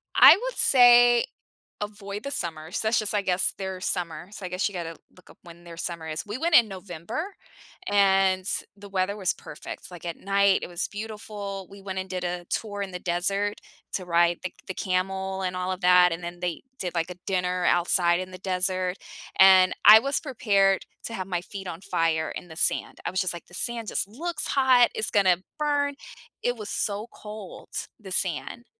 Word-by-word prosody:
I -, -, +9 dB
I 345 Hz, -, 0 dB
would -, -, -4 dB
say 245 Hz, -2 st, +7 dB, 0.6 s
avoid 205 Hz, -1 st, -6 dB
the 280 Hz, -, -5 dB
summer, 160 Hz, -, -4 dB
so 220 Hz, +2 st, -1 dB
that's 225 Hz, -, +3 dB
just, 215 Hz, -1 st, -2 dB
I 205 Hz, -, +2 dB
guess, 180 Hz, 0 st, +1 dB
their 190 Hz, -1 st, -5 dB
summer. 175 Hz, -2 st, -3 dB
So 200 Hz, -, -8 dB
I 180 Hz, -, -4 dB
guess 180 Hz, +3 st, 0 dB
you 200 Hz, -, -13 dB
gotta 165 Hz, -2 st, -5 dB, 0.2 s
look 185 Hz, -, -20 dB
up -, -, -20 dB
when 170 Hz, 0 st, -14 dB
their 170 Hz, -1 st, -11 dB
summer 170 Hz, -2 st, -5 dB
is. 155 Hz, 0 st, -4 dB
We 210 Hz, +4 st, -4 dB
went 330 Hz, +3 st, +2 dB
in 235 Hz, -2 st, +7 dB
November, 185 Hz, -, -6 dB, 0.6 s
and 195 Hz, -2 st, +3 dB, 0.3 s
the 200 Hz, 0 st, -12 dB
weather 195 Hz, +1 st, -1 dB
was 185 Hz, -3 st, 0 dB
perfect, -, -, -9 dB
like, 175 Hz, -1 st, -10 dB
at 170 Hz, -, -4 dB
night, 200 Hz, 0 st, +3 dB
it -, -, -4 dB
was 175 Hz, 0 st, -3 dB
beautiful. 205 Hz, -3 st, -6 dB
We 200 Hz, 0 st, -12 dB
went 190 Hz, -1 st, -4 dB
and 190 Hz, -, -6 dB
did 180 Hz, -1 st, -4 dB
a 175 Hz, 0 st, -3 dB
tour 205 Hz, -2 st, -3 dB
in 195 Hz, -, -7 dB
the 180 Hz, -, -5 dB
desert 195 Hz, +4 st, -1 dB, 0.3 s
to 185 Hz, -, -3 dB
ride 170 Hz, 0 st, +2 dB
the 185 Hz, -, -3 dB, 0.2 s
the 190 Hz, -, -4 dB
camel 190 Hz, +1 st, -2 dB
and 180 Hz, 0 st, -2 dB
all 185 Hz, 0 st, -2 dB
of 185 Hz, +1 st, -4 dB
that, 180 Hz, -1 st, +6 dB
and 170 Hz, +1 st, -7 dB
then 175 Hz, 0 st, -6 dB
they 175 Hz, -2 st, -3 dB, 0.2 s
did, 180 Hz, -1 st, -3 dB
like, 165 Hz, +1 st, -1 dB
a -, -, -7 dB
dinner 180 Hz, -1 st, 0 dB
outside 175 Hz, 0 st, +3 dB
in 185 Hz, 0 st, -6 dB
the 185 Hz, -, -8 dB
desert, 185 Hz, 0 st, -1 dB, 0.4 s
and 190 Hz, -1 st, +7 dB
I 215 Hz, +2 st, +11 dB
was 275 Hz, +3 st, -1 dB
prepared 200 Hz, -8 st, +1 dB, 0.2 s
to 230 Hz, -, -6 dB
have 185 Hz, -2 st, -5 dB
my 175 Hz, -2 st, -2 dB
feet 195 Hz, +1 st, -8 dB
on 165 Hz, +2 st, -7 dB
fire 165 Hz, -4 st, 0 dB
in -, -, -7 dB
the 160 Hz, -, -11 dB
sand. -, -, -1 dB
I -, -, -1 dB
was 185 Hz, -, 0 dB
just 185 Hz, -, 0 dB
like, 175 Hz, -, -10 dB
"The 175 Hz, -, -20 dB
sand 230 Hz, +1 st, -2 dB
just -, -, -1 dB
looks 330 Hz, +11 st, -4 dB
hot, 260 Hz, -3 st, +5 dB
it's 215 Hz, 0 st, -1 dB
gonna 190 Hz, -4 st, +4 dB, 0.2 s
burn." 285 Hz, -1 st, +1 dB, 0.5 s
It 245 Hz, 0 st, 0 dB
was 215 Hz, -2 st, -7 dB
so 205 Hz, +2 st, -2 dB
cold, 210 Hz, -3 st, -10 dB, 0.3 s
the 195 Hz, -3 st, -11 dB
sand, 185 Hz, +7 st, -2 dB
190 Hz, 210 wpm, -26 LUFS, 180-210 Hz, 0.6 s, I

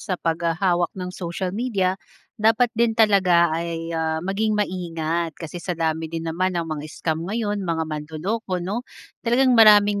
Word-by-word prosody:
sa 185 Hz, -, -3 dB
paghahawak 170 Hz, +1 st, 0 dB
ng 180 Hz, -1 st, -5 dB
social 180 Hz, +1 st, -4 dB
media, 200 Hz, -4 st, 0 dB, 0.5 s
dapat 225 Hz, +2 st, +3 dB
din 230 Hz, -1 st, +1 dB
talaga 185 Hz, -7 st, +4 dB
ay, 165 Hz, 0 st, -3 dB
ah, 160 Hz, -1 st, -1 dB
maging 210 Hz, +3 st, 0 dB
maingat 170 Hz, -4 st, -2 dB
kasi 170 Hz, +1 st, -7 dB
sa 180 Hz, 0 st, -4 dB
dami 160 Hz, 0 st, -1 dB
din 165 Hz, 0 st, -5 dB
naman 180 Hz, +3 st, -1 dB
ng 170 Hz, -, -1 dB
mga 155 Hz, -1 st, -5 dB
scam 160 Hz, 0 st, -3 dB
ngayon, 210 Hz, -1 st, -1 dB
mga 160 Hz, -1 st, 0 dB
manloloko 160 Hz, +7 st, -3 dB
'no? 205 Hz, +6 st, -2 dB, 0.4 s
Talagang 255 Hz, +2 st, +3 dB
maraming 210 Hz, -3 st, +6 dB
180 Hz, 155 wpm, -23 LUFS, 165-210 Hz, 0.5 s, maraming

